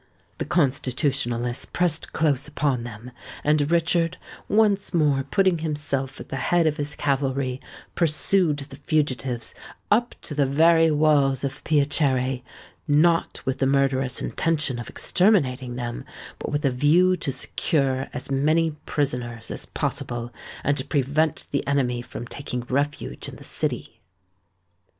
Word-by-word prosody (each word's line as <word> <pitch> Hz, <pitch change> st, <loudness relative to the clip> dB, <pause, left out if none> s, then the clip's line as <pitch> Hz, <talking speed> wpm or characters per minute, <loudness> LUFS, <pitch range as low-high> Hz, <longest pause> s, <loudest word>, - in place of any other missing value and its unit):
The -, -, -2 dB
Constitutionalists 130 Hz, -5 st, 0 dB
pressed 175 Hz, -3 st, 0 dB
close 145 Hz, -3 st, +1 dB
upon 140 Hz, -5 st, -1 dB
them; 120 Hz, +1 st, -9 dB, 0.3 s
and 150 Hz, -1 st, +2 dB
Richard, 170 Hz, +1 st, +2 dB, 0.3 s
once 205 Hz, -3 st, +2 dB
more 145 Hz, -4 st, +3 dB
putting 185 Hz, +5 st, +2 dB
himself 145 Hz, -4 st, -2 dB
at -, -, -9 dB
the 135 Hz, -, -3 dB
head 175 Hz, +5 st, +2 dB
of 155 Hz, -1 st, +1 dB
his 145 Hz, -1 st, -3 dB
cavalry, 135 Hz, -2 st, -1 dB, 0.3 s
pursued 165 Hz, 0 st, +2 dB
the 140 Hz, 0 st, -9 dB
fugitives 135 Hz, -5 st, -1 dB, 0.4 s
up 240 Hz, +3 st, +2 dB
to -, -, -5 dB
the 145 Hz, -2 st, +2 dB
very 165 Hz, +3 st, +5 dB
walls 145 Hz, -3 st, +3 dB
of 140 Hz, -, -4 dB
Piacere—not 145 Hz, +2 st, +1 dB
with 130 Hz, 0 st, -1 dB
the 135 Hz, -, +2 dB
murderous 135 Hz, -1 st, +1 dB
intention 155 Hz, -6 st, -1 dB
of 120 Hz, -, -7 dB
exterminating 130 Hz, -, +1 dB
them, 120 Hz, -1 st, -4 dB, 0.4 s
but -, -, -4 dB
with 145 Hz, +1 st, -1 dB
a 135 Hz, -, +3 dB
view 165 Hz, +8 st, +4 dB
to 140 Hz, -, -2 dB
secure 135 Hz, 0 st, 0 dB
as 130 Hz, -, -6 dB
many 155 Hz, +4 st, +2 dB, 0.2 s
prisoners 120 Hz, -5 st, -2 dB
as -, -, -4 dB
possible, 120 Hz, 0 st, -3 dB, 0.3 s
and 140 Hz, -1 st, 0 dB
prevent 145 Hz, +2 st, +1 dB
the 140 Hz, -, -1 dB
enemy 125 Hz, -4 st, +1 dB
from 120 Hz, -, -7 dB
taking 125 Hz, -1 st, -4 dB
refuge 140 Hz, +4 st, -2 dB
in -, -, -10 dB
the -, -, -13 dB
city. -, -, -4 dB
140 Hz, 135 wpm, -24 LUFS, 130-160 Hz, 0.4 s, very